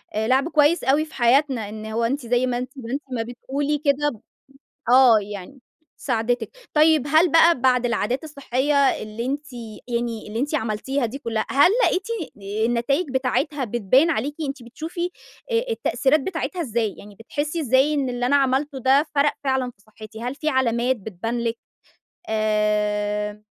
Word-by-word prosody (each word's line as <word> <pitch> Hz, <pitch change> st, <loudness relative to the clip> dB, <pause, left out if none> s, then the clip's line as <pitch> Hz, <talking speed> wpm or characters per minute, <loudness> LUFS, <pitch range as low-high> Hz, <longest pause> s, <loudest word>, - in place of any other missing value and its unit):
لعب 260 Hz, +8 st, +2 dB
كويس 305 Hz, +2 st, +3 dB
أوي 290 Hz, +4 st, +2 dB
في -, -, -17 dB
حياتنا، 245 Hz, -3 st, +2 dB
إن 215 Hz, 0 st, -8 dB
هو 220 Hz, +2 st, -2 dB
أنتِ 260 Hz, +2 st, -1 dB
زي 245 Hz, +1 st, +2 dB
ما 245 Hz, -1 st, -1 dB
أنتِ 250 Hz, +1 st, -5 dB
ما 235 Hz, -2 st, -7 dB
أنتِ 285 Hz, -, -2 dB
ما 230 Hz, -2 st, -1 dB
بتقولي 275 Hz, +5 st, -3 dB
كده، 285 Hz, -4 st, 0 dB, 0.7 s
آه، 250 Hz, -3 st, +7 dB
يعني 205 Hz, +6 st, -8 dB, 0.4 s
ساعدتِك، 240 Hz, -, -2 dB, 0.2 s
طيب 305 Hz, -2 st, +4 dB
هل 315 Hz, +2 st, +4 dB
بقى 330 Hz, -4 st, +5 dB
بعد 250 Hz, -2 st, +3 dB
العادات 240 Hz, +3 st, -1 dB
الصحية 280 Hz, -1 st, -1 dB
اللي 235 Hz, -4 st, +1 dB
أنتِ 280 Hz, 0 st, -4 dB, 0.3 s
يعني 235 Hz, -2 st, -3 dB
اللي 220 Hz, +2 st, -4 dB
أنتِ 295 Hz, +3 st, -1 dB
عملتيها 240 Hz, +3 st, -1 dB
دي 265 Hz, +5 st, -6 dB
كلها، 225 Hz, -4 st, -2 dB
هل 285 Hz, +7 st, +5 dB
لقيتِ 380 Hz, +3 st, +1 dB, 0.6 s
النتايج 240 Hz, +8 st, +1 dB
بتاعتها 270 Hz, +2 st, 0 dB
بتبان 240 Hz, -, +3 dB
عليكِ، 290 Hz, +1 st, -1 dB
أنتِ 270 Hz, -3 st, -6 dB
بتشوفي 330 Hz, +8 st, -5 dB, 0.4 s
أ 465 Hz, +1 st, 0 dB
التأثيرات 265 Hz, -, +1 dB
بتاعتها 345 Hz, +3 st, -3 dB
إزاي، 230 Hz, -, -1 dB
يعني 205 Hz, 0 st, -13 dB
بتحسي 295 Hz, -, -4 dB
إزاي 265 Hz, +3 st, +3 dB
إن 275 Hz, -3 st, 0 dB
اللي 245 Hz, 0 st, -2 dB
أنا 285 Hz, +3 st, +3 dB
عملته 270 Hz, +1 st, +1 dB
ده 270 Hz, +4 st, +4 dB
فرق 285 Hz, +1 st, +3 dB
فعلًا 265 Hz, -2 st, 0 dB
في 200 Hz, -, -30 dB
صحتي، 215 Hz, +1 st, -12 dB
هل 250 Hz, +3 st, -3 dB
في 310 Hz, +1 st, -1 dB
علامات 255 Hz, -1 st, +1 dB
بتبان 220 Hz, +3 st, -4 dB
لِك 230 Hz, 0 st, -1 dB, 0.7 s
آآ، 210 Hz, -1 st, 0 dB
255 Hz, 160 wpm, -23 LUFS, 225-290 Hz, 0.7 s, آه